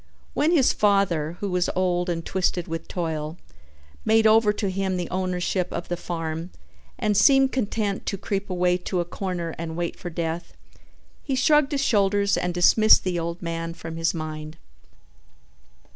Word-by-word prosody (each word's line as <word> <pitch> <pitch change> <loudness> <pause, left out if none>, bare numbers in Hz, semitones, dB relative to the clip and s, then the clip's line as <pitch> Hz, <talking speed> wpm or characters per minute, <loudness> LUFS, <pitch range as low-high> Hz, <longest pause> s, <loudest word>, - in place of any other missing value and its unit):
When 300 - +2
his 310 -7 +4
father, 180 -6 +1
who 200 -2 -2
was 180 0 +1
old 180 -1 0
and 165 -1 -3
twisted 180 -2 -1
with 165 0 -5
toil, 160 -2 -3 0.7
made 220 0 +3
over 220 -1 +5
to 205 -2 -2
him 190 -1 -1
the 175 -2 -3
ownership 185 0 -1
of 170 - -5
the 175 - 0
farm 165 -1 -4 0.5
and 210 -1 0
seemed 270 +6 +5
content 210 -4 -2
to 195 - -1
creep 200 +1 -3
away 180 -1 +1
to 180 0 -3
a 175 - 0
corner 175 -2 -4
and 165 -1 -5
wait 170 -1 -2
for 180 - -7
death, 165 0 -4 0.7
he 275 - -2
shrugged 295 +2 +3
his 280 -1 0
shoulders 200 -3 +2
and 180 - -1
dismissed 200 +5 +5
the 180 -2 -1
old 170 +1 -4
man 165 0 -4
from 165 -1 -7
his 165 0 +1
mind. 155 0 -6
180 Hz, 165 wpm, -24 LUFS, 170-205 Hz, 0.7 s, over